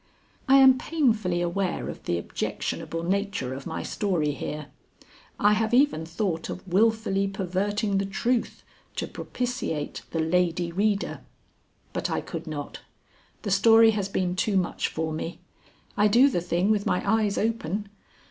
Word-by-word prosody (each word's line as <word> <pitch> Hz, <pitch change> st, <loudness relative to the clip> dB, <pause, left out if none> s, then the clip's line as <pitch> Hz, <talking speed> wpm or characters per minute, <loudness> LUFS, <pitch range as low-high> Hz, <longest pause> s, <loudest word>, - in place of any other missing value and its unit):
I 270 Hz, -, +6 dB
am 265 Hz, -1 st, +7 dB
painfully 220 Hz, -, +1 dB
aware 175 Hz, +2 st, -1 dB
of -, -, -8 dB
the 85 Hz, -, 0 dB
objectionable 165 Hz, -, -3 dB
nature 190 Hz, -8 st, -1 dB
of 135 Hz, +1 st, -7 dB
my 160 Hz, -, -4 dB
story 175 Hz, -8 st, 0 dB
here. 150 Hz, +1 st, -5 dB, 0.7 s
I 205 Hz, +1 st, +5 dB
have 220 Hz, +2 st, +1 dB
even 250 Hz, -, +3 dB
thought 170 Hz, -2 st, -2 dB
of 185 Hz, -, -7 dB
wilfully 200 Hz, 0 st, +2 dB
perverting 195 Hz, +2 st, -1 dB
the 195 Hz, -, 0 dB
truth 235 Hz, +4 st, -1 dB, 0.3 s
to -, -, -2 dB
propitiate 245 Hz, -12 st, -4 dB
the 165 Hz, -, -3 dB
Lady 175 Hz, +1 st, +1 dB
Reader. 200 Hz, +3 st, 0 dB, 0.7 s
But -, -, -2 dB
I -, -, 0 dB
could -, -, -7 dB
not. -, -, -5 dB, 0.6 s
The 205 Hz, -, -2 dB
story 225 Hz, +3 st, +6 dB
has 200 Hz, -2 st, -2 dB
been 180 Hz, -2 st, -1 dB
too 195 Hz, +1 st, +1 dB
much 180 Hz, -2 st, 0 dB
for 160 Hz, 0 st, -3 dB
me. 165 Hz, +2 st, -4 dB, 0.6 s
I 210 Hz, -, +4 dB
do 245 Hz, +7 st, +6 dB
the 175 Hz, -, 0 dB
thing 175 Hz, +4 st, +1 dB
with 210 Hz, -2 st, +1 dB
my 180 Hz, -, 0 dB
eyes 210 Hz, -1 st, +2 dB
open. 210 Hz, -2 st, -1 dB
195 Hz, 150 wpm, -26 LUFS, 175-220 Hz, 0.7 s, am